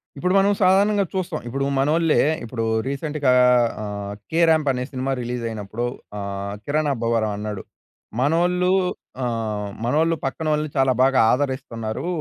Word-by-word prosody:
ఇప్పుడు 180 +6 0
మనం 195 +1 +4
సాధారణంగా 200 +2 +4
చూస్తాం. 185 -2 -2
ఇప్పుడు 135 +3 -2
మనోళ్ళే, 155 +3 +3 0.2
ఇప్పుడు 115 0 -4 0.2
రీసెంట్‌గా 140 0 0 0.5
ఆహ్, 100 -1 -5 0.2
'కేరాంప్' 160 -3 +3
అనే 125 -1 -2
సినిమా 135 0 -2
రిలీజ్ 120 0 -4
అయినప్పుడు 110 +2 -4 0.3
ఆహ్, 100 0 -4
'కిరణ్ 150 +1 0
అబ్బవరం' 115 -3 0
అన్నాడు. 105 -2 -5 0.6
మనోళ్ళూ 175 +6 +2 0.5
ఆహ్, 110 -4 -2 0.2
మనోళ్ళు 160 +6 +2
పక్కనోళ్ళని 150 +2 -1
చాలా 135 -1 +4
బాగా 135 0 +3
ఆదరిస్తున్నారూ. 130 -3 -2
135 Hz, 125 wpm, -22 LUFS, 115-160 Hz, 0.6 s, మనం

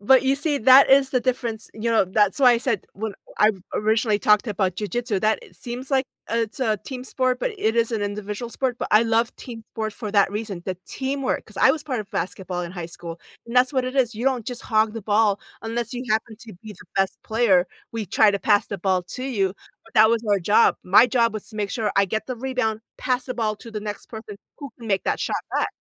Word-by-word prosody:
But, 260 +6 +5
you 270 +1 +2
see, 290 -1 0
that 265 +3 +7
is 270 0 +6
the 255 - +1
difference 240 -3 -2
you 225 +2 -2
know, 225 -4 +4
that's 205 +3 +1
why 255 -3 +7
I 235 - +2
said- 235 -6 -1
when 215 +2 -4 0.3
I 210 - +6 0.2
originally 215 0 +2
talked 210 +3 +3
about 190 -3 -1
jujitsu- 220 0 -2
that 215 0 +2
it - - -17
seems 250 +3 -7
like 265 0 +2 0.3
it's 230 +2 -2
a 220 -4 +1
team 255 +3 -7
sport, 255 -1 0
but - - -1
it 220 +2 +1
is 230 0 +2
an 215 -2 -1
individual 210 +3 -4
sport, 250 -1 -2
but - - -3
I 215 +2 +6
love 230 +1 +1
team 230 -3 -9
sports 220 -1 -3
for 215 -4 -5
that 200 -2 +4
reason, 205 -4 -4
the 185 -1 -2
teamwork, 270 0 -2
'cause 215 - -16
I 265 - +6
was 300 0 -1
part 255 -6 -2
of 205 -1 -10
basketball 180 -1 -3
in 170 +1 -6
high 175 -3 -5
school, 170 -1 -8 0.3
and 235 +2 -5
that's 255 +2 +4
what 260 -2 +1
it 255 +2 -5
is, 240 -3 +2
you 235 +4 -5
don't 255 -4 +1
just 245 -1 -5
hog 215 -1 +2
the 225 - -5
ball 205 -1 +2 0.2
unless 230 +1 -3
you 245 +1 -4
happen 220 0 0
to 225 - -11
be 215 -1 -8
the 200 - -16
best 195 0 +1
player, 210 -6 +3 0.3
we 225 -2 -3
try 210 +4 +4
to 200 - -1
pass 205 +2 +3
the 200 - -4
ball 185 -1 +1
to 255 +8 -7
you, 195 -7 0 0.3
but 225 - -21
that 220 +1 +7
was 230 0 +1
our 200 - +4
job, 205 +5 +4
my 200 +7 +6
job 235 -2 +2
was 215 - -7
to 215 - -11
make 205 -1 -2
sure 215 -3 -1
I 200 - +5
get 215 +3 -3
the 255 -2 -4
rebound, 245 -4 -2 0.2
pass 255 0 -1
the 255 - -4
ball 215 -3 -1
to 230 - -12
the 210 -1 -5
next 210 0 -6
person 220 -2 -8 0.2
who 280 - -7
can 230 - -10
make 195 -2 +1
that - - 0
shot - - -1 0.2
back. - - +1
220 Hz, 250 wpm, -23 LUFS, 205-250 Hz, 0.3 s, that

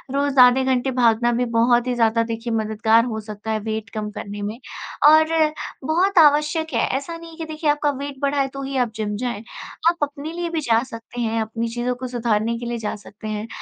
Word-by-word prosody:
रोज़ 280 -1 +1
आधे 250 +1 +7
घंटे 260 0 +1
भागना 235 +1 +4
भी 245 +1 0
बहुत 240 +1 +3
ही 250 - +1
ज़्यादा 230 0 +2
देखिए 230 +1 -4
मददगार 220 +1 +2
हो 220 -3 -3
सकता 215 +1 -6
है 215 - 0
वेट 220 +1 -4
कम 210 -1 -3
करने 205 -1 -7
में 210 +3 -4 0.5
और 315 +1 +6 0.5
बहुत 355 +6 +1
आवश्यक 300 +1 +3
है। - - +2
ऐसा 335 +5 -6
नहीं 335 0 -11
है 325 - -13
कि 325 - -5
देखिए, 310 -1 -2
आपका 295 0 +2
वेट 280 0 -6
बढ़ा 280 0 +1
है, 270 - +1
तो 275 +1 -8
ही 270 0 -5
आप 245 -3 +1
जिम 210 -1 -3
जाएँ। 235 -3 -3 0.5
आप 345 - 0
अपने 290 +2 -4
लिए 345 0 -3
भी 325 -2 -2
जा 230 -3 +2
सकते 240 0 -8
हैं, 225 0 0
अपनी 230 +1 -3
चीज़ों 245 +1 -2
को 255 +1 -6
सुधारने 230 -2 0
के 240 - -6
लिए 235 0 -3
जा 215 -2 -3
सकते 210 +1 -11
हैं, 215 +1 -4
240 Hz, 225 wpm, -22 LUFS, 225-285 Hz, 0.5 s, आधे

